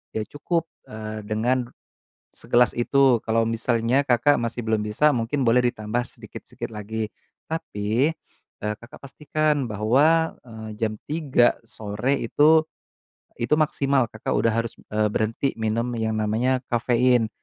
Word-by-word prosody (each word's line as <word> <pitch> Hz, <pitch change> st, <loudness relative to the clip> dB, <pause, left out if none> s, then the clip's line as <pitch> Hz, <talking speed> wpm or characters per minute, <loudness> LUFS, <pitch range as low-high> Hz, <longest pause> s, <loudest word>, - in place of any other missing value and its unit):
ya 110 Hz, -, 0 dB
cukup, 165 Hz, +3 st, -2 dB, 0.2 s
eee, 110 Hz, 0 st, -6 dB
dengan 120 Hz, +4 st, 0 dB, 0.7 s
segelas 120 Hz, -1 st, +2 dB
itu. 130 Hz, 0 st, +3 dB
Kalau 115 Hz, 0 st, +2 dB
misalnya 115 Hz, +2 st, +1 dB
Kakak 125 Hz, +3 st, +4 dB
masih 120 Hz, +1 st, -3 dB
belum 110 Hz, -1 st, +1 dB
bisa, 105 Hz, +9 st, +3 dB
mungkin 120 Hz, +5 st, -1 dB
boleh 120 Hz, +2 st, +4 dB
ditambah 110 Hz, +3 st, -2 dB
sedikit -, -, -11 dB
sikit -, -, -7 dB
lagi. 110 Hz, +1 st, -4 dB, 0.4 s
Tapi, 130 Hz, -3 st, 0 dB, 0.5 s
eee, 105 Hz, 0 st, -1 dB
Kakak 120 Hz, -, -13 dB
pastikan 150 Hz, 0 st, -1 dB
bahwa, 140 Hz, +10 st, +3 dB
eee, 110 Hz, -2 st, -9 dB
jam 110 Hz, -1 st, 0 dB, 0.2 s
3 145 Hz, -6 st, +3 dB
sore 110 Hz, +5 st, -2 dB
itu, 155 Hz, +6 st, +4 dB, 0.7 s
itu 120 Hz, -, -3 dB
maksimal, 140 Hz, -4 st, +2 dB
Kakak 110 Hz, 0 st, -4 dB
udah 115 Hz, -, +2 dB
harus, 115 Hz, +1 st, -2 dB, 0.2 s
eee, 105 Hz, 0 st, +2 dB
berhenti 115 Hz, +6 st, 0 dB
minum 115 Hz, +2 st, -1 dB
yang 110 Hz, -1 st, -1 dB
namanya 115 Hz, +5 st, +1 dB
kafein. 120 Hz, -1 st, +2 dB
120 Hz, 135 wpm, -24 LUFS, 110-135 Hz, 0.7 s, Kakak